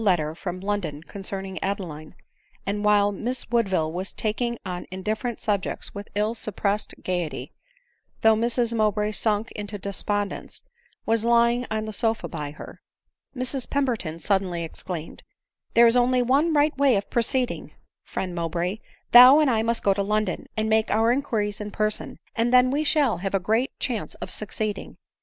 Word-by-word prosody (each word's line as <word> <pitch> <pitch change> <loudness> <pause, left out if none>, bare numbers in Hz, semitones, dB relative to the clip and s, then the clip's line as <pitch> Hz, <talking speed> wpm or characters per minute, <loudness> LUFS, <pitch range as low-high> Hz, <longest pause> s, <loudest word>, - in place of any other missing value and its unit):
letter 165 -7 +2
from 180 +2 -5
London 185 -7 -3
concerning 195 0 -5
Adeline; 175 -6 -4 0.5
and 205 +1 -2
while 205 -1 +4
Miss 240 +6 -4
Woodville 190 -9 +1
was 185 +3 -2
talking 235 +2 -2
on 180 -1 -5
indif 190 +4 -2
ferrent 245 -3 -3
subjects 200 -3 -2
with 200 0 -8
ill 210 +2 +1
suppressed 210 -2 -2
gaiety, 175 -4 -3 0.7
though 220 0 +6
Mrs 235 +1 0
Mowbray, 210 -1 +1
sunk 215 0 0
into 205 0 -6
despondence, 200 +1 -3 0.4
was 225 0 +2
lying 235 +1 +3
on 220 0 -2
the 215 - -6
sofa 225 +1 0
by 150 -3 -5
her; 150 - -11 0.5
Mrs 255 0 -2
Peroberton 235 - -1
suddenly 185 -3 0
exclaimed 165 0 -6 0.2
— - - -65
" - - -47
There 235 - +8
is 230 +1 +5
only 250 0 +3
one 280 +7 +3
right 300 0 +3
way 275 -4 +5
of 200 0 -2
proceeding, 245 +1 0 0.3
friend 185 -2 -4
Mowbray 175 +4 -2 0.2
— - - -39
thou 250 +4 +10
and 300 -4 +4
I 220 -2 +2
must 230 +1 0
go 200 - +4
to 200 - -1
London, 210 -1 -1
and 215 0 +1
make 220 0 +2
our 225 +2 +3
inquiries 215 -6 -1
in 210 - -4
person, 215 0 -2 0.2
and 235 +1 +1
then 250 0 +5
we 290 +3 +1
shall 290 - +2
have 195 +3 -2
a - - +3
great 220 +8 +1
chance 235 -5 -3
of - - -7
suc 215 - -5
ceeding." 215 -2 -4
215 Hz, 175 wpm, -25 LUFS, 195-235 Hz, 0.7 s, thou